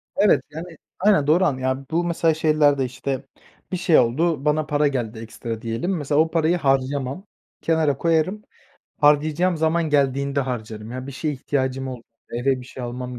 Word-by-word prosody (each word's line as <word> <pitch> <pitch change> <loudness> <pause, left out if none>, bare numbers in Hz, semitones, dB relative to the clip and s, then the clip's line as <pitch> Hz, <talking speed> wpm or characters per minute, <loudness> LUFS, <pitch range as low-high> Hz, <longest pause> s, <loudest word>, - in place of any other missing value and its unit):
Evet 205 +1 +4
yani, 165 +1 -8 0.2
aynen 190 -7 +3
doğru 175 +5 +4
anlad 130 -6 0
yani 130 +1 -1
bu 170 +2 +1
mesela 170 -1 +1
şeylerde 150 -3 +3
işte 130 +2 -4 0.5
bir 185 - -1
şey 170 -2 +4
oldu, 145 +5 +1
bana 150 0 +2
para 150 0 +2
geldi 120 -5 -3
ekstra 115 0 -6
diyelim. 120 +11 -2
Mesela 145 0 0
o 160 - 0
parayı 165 +1 +2
harcamam, 135 +3 0 0.4
kenara 160 -4 +1
koyarım, 170 +7 +1 0.6
harcayacağım 155 +4 +3
zaman 160 0 +1
geldiğinde 140 0 +1
harcarım. 110 -4 -5
Ya 130 +1 -6
bir 140 - -7
şeye 150 +2 -2
ihtiyacım 130 -1 -2
ol 125 -2 -7 0.3
eve 130 +2 0
bir - - -10
şey 130 - -9
almam 125 0 -5
145 Hz, 170 wpm, -23 LUFS, 130-160 Hz, 0.6 s, Evet